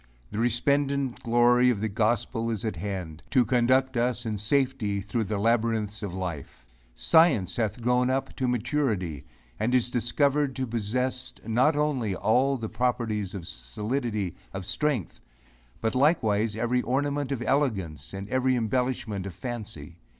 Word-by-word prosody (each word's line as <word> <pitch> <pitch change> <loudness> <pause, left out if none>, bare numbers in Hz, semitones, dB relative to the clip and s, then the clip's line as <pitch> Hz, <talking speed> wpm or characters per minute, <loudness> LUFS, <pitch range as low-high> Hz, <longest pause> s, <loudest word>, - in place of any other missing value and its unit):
The 105 - -3
resplendent 135 +2 +1
glory 120 +1 +4
of 120 -5 +1
the 110 - 0
gospel 115 +2 0
is 110 -2 -3
at 110 - -2
hand, 85 -3 -5
to 125 -3 +4
conduct 130 +1 +2
us 120 0 0
in 110 -2 -2
safety 125 -3 0
through 105 +3 -2
the 105 +1 -2
labyrinths 110 -1 +1
of 100 -3 -4
life. 85 -9 -6 0.3
Science 105 - +4
hath 110 -1 -1
grown 125 +1 +3
up 135 +1 -1
to 130 - 0
maturity, 115 - -1 0.3
and 125 +4 +1
is 125 -1 +2
discovered 140 +3 +1
to 130 - -1
possess 125 +3 -2
not 125 +7 +3
only 135 -9 0
all 125 +8 +2
the 115 -2 -4
properties 110 -4 -1
of 85 -4 -6
solidity 105 - -3 0.2
of 95 -1 -4
strength, 145 - -1 0.6
but 110 -1 0
likewise 115 -7 +2
every 120 +3 +1
ornament 140 +2 -1
of 125 -3 -2
elegance, 95 - -1
and 95 0 -6
every 130 0 +2
embellishment 115 -4 -1
of 90 - -8
fancy. 100 - -6
120 Hz, 150 wpm, -27 LUFS, 105-130 Hz, 0.6 s, glory